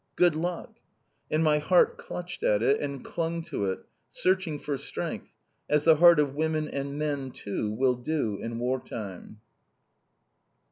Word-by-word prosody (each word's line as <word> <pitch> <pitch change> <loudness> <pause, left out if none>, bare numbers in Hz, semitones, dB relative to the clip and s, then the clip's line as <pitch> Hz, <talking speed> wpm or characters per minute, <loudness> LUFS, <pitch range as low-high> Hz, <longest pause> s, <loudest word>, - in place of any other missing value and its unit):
"Good 175 -2 +4
luck!" 170 +3 -4 0.5
And 155 +1 +2
my 150 -1 +4
heart 175 +4 +3
clutched 180 0 -7
at 105 +1 +2
it, 140 +4 +3
and 140 -2 -4
clung 165 0 -2
to 155 - -3
it, 95 -1 -3 0.2
searching 185 -5 +1
for 145 0 -3
strength, 135 - -4 0.4
as 150 0 +3
the 160 -1 +6
heart 170 -1 +8
of 145 -2 +1
women 155 +1 0
and 140 0 -4
men 145 -3 -2
too 105 -3 -4
will 125 +4 +2
do 125 -5 -2
in 115 0 -4
war 125 +2 0
time! 105 0 -8
150 Hz, 155 wpm, -28 LUFS, 125-160 Hz, 0.5 s, heart